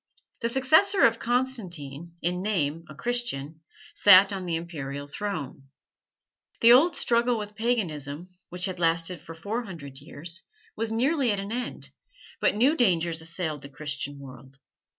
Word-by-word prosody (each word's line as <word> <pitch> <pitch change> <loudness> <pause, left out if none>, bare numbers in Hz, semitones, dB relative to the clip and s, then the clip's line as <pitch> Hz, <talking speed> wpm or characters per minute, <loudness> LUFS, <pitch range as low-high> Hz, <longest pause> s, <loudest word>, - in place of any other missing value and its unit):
The 230 - -1
successor 315 +11 +4
of 230 0 +2
Constantine, 175 - -2
in 180 +1 -1
name 165 -6 -1
a 155 - -10
Christian, 160 - -1 0.3
sat 200 0 +7
on 190 -2 -5
the 170 - -1
Imperial 145 -4 -5
throne. 145 -6 -5 0.9
The 230 - +8
old 290 +8 +6
struggle 235 0 +1
with 210 -1 -6
paganism, 175 - -2 0.2
which 180 +1 0
had 185 -2 -4
lasted 165 0 +1
for 165 0 -10
four 215 +8 -4
hundred 140 -9 -9
years, 165 +4 -8 0.3
was 225 - -2
nearly 260 +2 +1
at 205 - -1
an 200 +2 -5
end, 245 +1 -4 0.5
but - - +2
new 260 +8 +3
dangers 170 - +2
assailed 160 -2 -1
the 140 - -9
Christian 145 0 -4
world. 135 -1 -13
180 Hz, 150 wpm, -26 LUFS, 150-230 Hz, 0.9 s, The